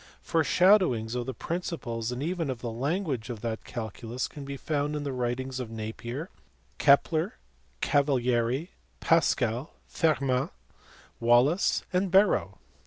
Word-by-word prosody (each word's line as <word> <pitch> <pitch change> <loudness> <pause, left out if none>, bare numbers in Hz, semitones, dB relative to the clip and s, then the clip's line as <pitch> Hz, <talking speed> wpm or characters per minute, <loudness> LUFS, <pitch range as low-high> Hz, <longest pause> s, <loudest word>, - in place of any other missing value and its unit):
Foreshado 180 +4 +4
wings 110 -2 -3
of 125 -1 -3
the 130 - -3
principles 130 -10 -3
and 125 +3 -3
even 165 -2 -2
of 125 -3 -4
the 120 - -3
language 135 - -2
of 115 -4 -5
that 110 -1 -3
calculus 115 +1 -5
can 145 - -9
be 140 0 -6
found 150 0 -1
in 150 - -3
the 140 -2 -3
writings 125 +1 -2
of 125 -3 -4
Napier, 115 +7 -6 0.5
Kepler, 155 +6 +3 0.5
Cavalieri, 130 +1 +1 0.3
Pascal, 130 -5 +1
Fermat, 135 -5 +1 0.7
Wallis, 120 +9 +3
and 185 +1 +1
Barrow. 190 - +3
130 Hz, 130 wpm, -28 LUFS, 120-160 Hz, 0.7 s, Foreshado